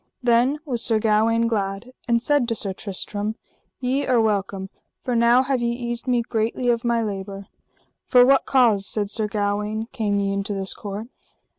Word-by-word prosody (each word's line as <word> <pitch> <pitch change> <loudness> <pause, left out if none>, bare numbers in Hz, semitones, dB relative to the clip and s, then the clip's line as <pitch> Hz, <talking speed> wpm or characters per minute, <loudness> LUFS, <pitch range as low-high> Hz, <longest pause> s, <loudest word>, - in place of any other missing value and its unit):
Then 245 +4 +3
was 245 -5 -1
Sir 225 - +2
Gawaine 225 +2 +2
glad, 200 +1 -3 0.2
and 235 -1 +3
said 275 +1 +2
to 230 - -1
Sir 195 -3 -2
Tristram: 205 +2 -3 0.4
Ye 265 +2 -1
are 250 -2 +3
welcome, 195 -3 -1 0.3
for 250 -2 -1
now 235 +2 +4
have 265 -2 -1
ye 235 - 0
eased 240 0 -4
me 245 -2 +2
greatly 230 +2 -1
of 235 0 +1
my 235 -1 +1
labour. 195 -1 -5 0.6
For 245 -1 +6
what 270 +1 +3
cause, 225 -7 +3
said 205 -2 0
Sir 215 -1 -1
Gawaine, 210 +1 -2
came 205 -3 -1
ye 200 0 -1
into 200 +1 -2
this 195 -1 0
court? 205 +1 -6
225 Hz, 175 wpm, -23 LUFS, 205-240 Hz, 0.6 s, For